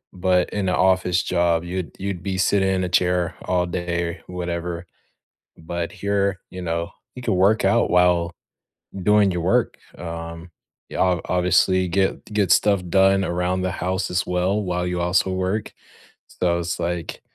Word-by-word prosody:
but 90 0 +2
in 100 -2 -1
a - - +1
office 90 -2 +2
job, 85 -2 +1
you'd 90 0 -4
you'd 95 -3 -3
be 95 -1 -2
sitting 95 0 +2
in 95 -1 0
a - - -3
chair 90 -1 +1
all 90 -1 +1
day, 85 -1 -3
or 90 - -9
whatever. 85 -1 -4 0.7
But 85 +1 -4
here, 100 -1 -1
you 90 - -7
know, 85 0 -2 0.3
you 125 - -7
could 110 -5 0
work 100 +4 +3
out - - +3
while 90 -1 +3 0.7
doing 105 0 +4
your 90 - -2
work, 115 +7 +1 0.2
um, 85 0 -7 0.4
you - - -6
obv 90 -2 +2
obviously 90 +1 +3
get 95 +2 0
get 105 -4 +1
stuff 100 -3 +3
done 95 +1 +4
around 90 +1 -1
the 95 - 0
house 95 0 -2
as 90 0 0
well 90 +4 0
while 90 -1 -2
you 90 0 -2
also 90 +2 +1
work. 95 +3 -2 0.7
So, 85 -1 +2
it's, 85 0 -3
like, 85 -1 -3
90 Hz, 165 wpm, -22 LUFS, 85-95 Hz, 0.7 s, doing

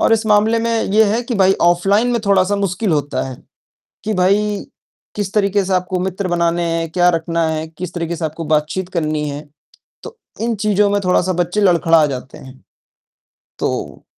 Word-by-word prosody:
और - - +3
इस 225 0 +2
मामले 215 +2 +3
में 230 0 0
ये 220 +1 +5
है 240 - -1
कि 240 0 -4
भाई 190 -2 +4
ऑफलाइन 195 +7 +3
में 235 - 0
थोड़ा-सा 200 0 +3
मुश्किल 195 -1 -1
होता 145 -3 -1
है 130 - -8 0.7
कि 215 - -2
भाई 200 +2 +1 0.5
किस 200 -2 -3
तरीके 200 -1 +2
से 190 - -1
आपको 185 0 -1
मित्र 190 +1 -3
बनाने 170 -1 0
हैं, 165 -1 -2
क्या 175 +1 +3
रखना 165 -1 0
है, 160 0 -3
किस 170 +2 -8
तरीके 170 -1 -3
से 165 - -3
आपको 160 +2 -5
बातचीत 155 +4 -1
करनी 155 -4 -2
है। 145 +1 -5 0.6
तो 470 0 -10 0.2
इन 230 +1 0
चीज़ों 210 -1 +3
में 205 0 +1
थोड़ा-सा 180 0 +2
बच्चे 175 +3 -1
लड़खड़ा 165 -4 +4
जाते 130 -1 -7
हैं। 130 0 -13 1.0
तो, - - -4
180 Hz, 180 wpm, -18 LUFS, 165-205 Hz, 1.0 s, ये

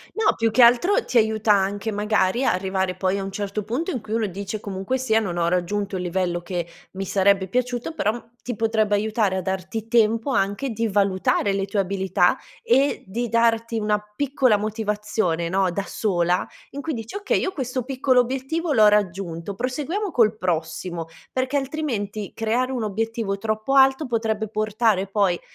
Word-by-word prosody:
No, 445 - +3
più 225 0 +1
che 220 +4 +2
altro 250 - +5
ti - - -3
aiuta 220 -1 +3
anche 200 +2 0
magari 210 +2 +1
a - - +3
arrivare 190 0 -1
poi 190 0 0
a 195 - -3
un 195 - -5
certo 205 +1 -3
punto 265 - -2
in 245 - -4
cui 220 - -8
uno 225 -1 +1
dice: 200 +2 -5
“Comunque 200 +6 -3
sia, 225 -3 +2
non 175 -5 -3
ho 170 0 +2
raggiunto 195 +3 -1
il 180 - -3
livello 175 -1 -1
che 175 -2 -3 0.3
mi 195 +1 -5
sarebbe 195 -1 +2
piaciuto,” 250 - -2
però 230 -2 -2
ti 245 - -4
potrebbe 220 -1 +1
aiutare 210 -2 +1
a - - 0
darti 190 +4 -4
tempo 225 +2 +2
anche 205 +4 0
di 230 +1 -1
valutare 200 0 +1
le 195 0 0
tue 205 +1 -3
abilità 190 0 +2 0.3
e 285 - +2
di 230 +5 -3
darti 230 0 +2
una 210 -1 +1 0.2
piccola 260 -4 +2
motivazione, 210 -5 -1
no, 190 0 +1
da 195 +3 -3
sola, 180 -4 0 0.2
in 285 +1 -6
cui 320 - -2
dici: 230 - -6
“Okay, 410 0 +1
io 380 - -1
questo 255 -5 -3
piccolo 255 0 +2
obiettivo 270 +6 -1
l'ho 215 -2 +7
raggiunto, 190 -3 -1
proseguiamo 295 - -2
col 220 -6 +3
prossimo,” 170 -1 -3 0.3
perché 260 +2 -1
altrimenti 260 -8 -3
creare 235 +4 0
un 250 -3 -2
obiettivo 220 -1 -2
troppo 215 +5 -1
alto 270 +2 +5
potrebbe 220 -3 -1
portare 215 -2 +1
poi, 195 -3 +1
215 Hz, 175 wpm, -23 LUFS, 195-245 Hz, 0.3 s, l'ho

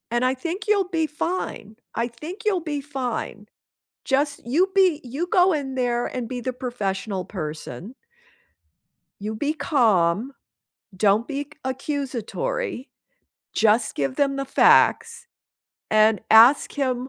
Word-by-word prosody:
And 240 +1 +1
I 255 - +2
think 345 +9 -5
you'll 400 -3 +2
be 325 -3 0
fine. 300 - -4 0.2
I 235 +1 -1
think 310 - -9
you'll 405 -4 +2
be 305 -4 -4
fine. 255 -6 -5 0.6
Just 285 +2 0
You 335 +11 +2
be 370 -6 +4
You 280 +8 -4
go 365 +1 +4
in 275 -4 -3
there 240 -1 0
and 245 -3 -5
be 250 0 -4
the 255 +2 -3
professional 210 -6 -3
person 160 - -7 1.3
you 215 +2 -4
be 290 +7 -1
calm, 235 - +1 0.6
don't 205 +4 +2
be 285 0 -3
c 290 - -26
accusatory, 275 - -3 0.6
just 220 +1 +2
give 135 -2 -2
them 275 -1 +1
the 275 0 -3
facts, 465 - +3 0.6
and 215 0 +4
ask 230 +6 +7
him 255 -3 -2
260 Hz, 135 wpm, -23 LUFS, 220-305 Hz, 1.3 s, ask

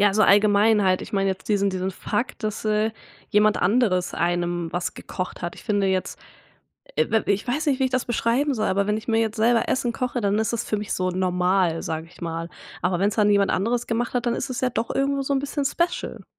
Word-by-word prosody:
Ja 205 -1 +4
so 215 - +4
allgemein 205 +1 +5
halt 185 -1 +2
ich - - -10
meine 195 -1 +1
jetzt 190 - -6
diesen 200 -1 +2
diesen 185 0 -2
Fakt, 235 +5 -3
dass, 215 +1 -3
äh, 215 +1 +1 0.4
jemand 210 0 +4
anderes 190 -3 +2
einem 175 -1 -1
was 175 0 -2
gekocht 185 - -6
hat. 175 - -3
Ich - - -13
finde 205 -3 +1
jetzt, 190 -1 -1 0.8
äh, - - +2
w 220 -2 +1
w - - +2
ich 200 +5 -2
weiß 295 +6 -1
nicht 275 -2 +2
wie 265 - +3
ich 260 - 0
das 255 -1 -1
beschreiben 245 +4 +1
soll, 215 -3 -1
aber 200 +1 +1
wenn 210 +1 0
ich 220 - -9
mir 225 -1 +2
jetzt 225 0 -1
selber 230 +1 +2
Essen 240 -2 0
koche, 250 0 -2
dann 200 +1 +1
ist 220 -1 0
es 235 - -2
für 215 - 0
mich 205 0 -4
so 185 0 0
normal, 180 -1 +1
sage 160 0 -4
ich - - -18
mal. 165 0 -4 0.3
Aber 180 0 0
wenn's 200 +1 +1
dann 210 -2 +3
jemand 200 -1 +3
anderes 235 +5 0
gemacht 235 +1 -1
hat, 245 -1 -1
dann 240 - +1
ist 270 - -3
es 255 - -3
ja 255 - +2
doch 230 -1 -2
irgendwo 275 0 0
so 275 - -3
'n 270 - +2
bisschen 285 +1 -3
Special. 345 +5 -2
210 Hz, 245 wpm, -24 LUFS, 185-240 Hz, 0.8 s, allgemein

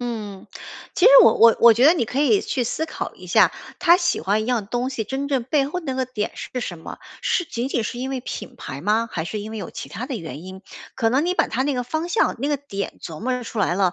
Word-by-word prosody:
嗯， 215 -5 -5 0.5
其 - - +1
实 - - +8
我 - - +7
我 230 0 +6
我 235 -1 +9
觉 240 +4 +2
得 320 - +8
你 270 - 0
可 255 +5 -4
以 395 +7 +4
去 250 -3 -2
思 315 +7 -2
考 320 - -6
一 - - -13
下， - - +5 0.3
她 350 -1 +6
喜 345 -2 0
欢 210 +3 +1
一 - - -5
样 235 -5 0
东 245 +3 -2
西 230 -5 -3
真 270 +5 -3
正 265 -4 0
背 275 +1 +1
后 360 +5 -4
那 270 -6 -4
个 260 0 0
点 225 -4 -4
是 250 - -5
什 175 -7 -5
么？ - - -9 0.2
是 350 - +1
仅 245 -3 -4
仅 235 -5 -1
是 240 - -4
因 265 +1 -3
为 260 -2 -3
品 - - -7
牌 135 +1 -7
吗？ 220 +5 +1
还 160 -2 -3
是 210 +4 -4
因 215 +2 -7
为 - - -5
有 185 - -6
其 - - -8
他 250 - -6
的 265 -4 -4
原 160 -4 -8
因？ 190 +1 -10 0.3
可 225 0 +1
能 275 +6 +2
你 360 - +1
把 - - +2
它 260 - -1
那 285 -1 0
个 250 -1 -2
方 315 +7 -3
向 440 - +1
那 285 - -1
个 290 - +1
点 200 -8 -5
琢 160 +1 -8
磨 255 +3 -2
着 250 -1 -3
出 220 - -4
来 175 - +1
了， 185 -3 +2
245 Hz, 300 characters per minute, -22 LUFS, 210-275 Hz, 0.5 s, 我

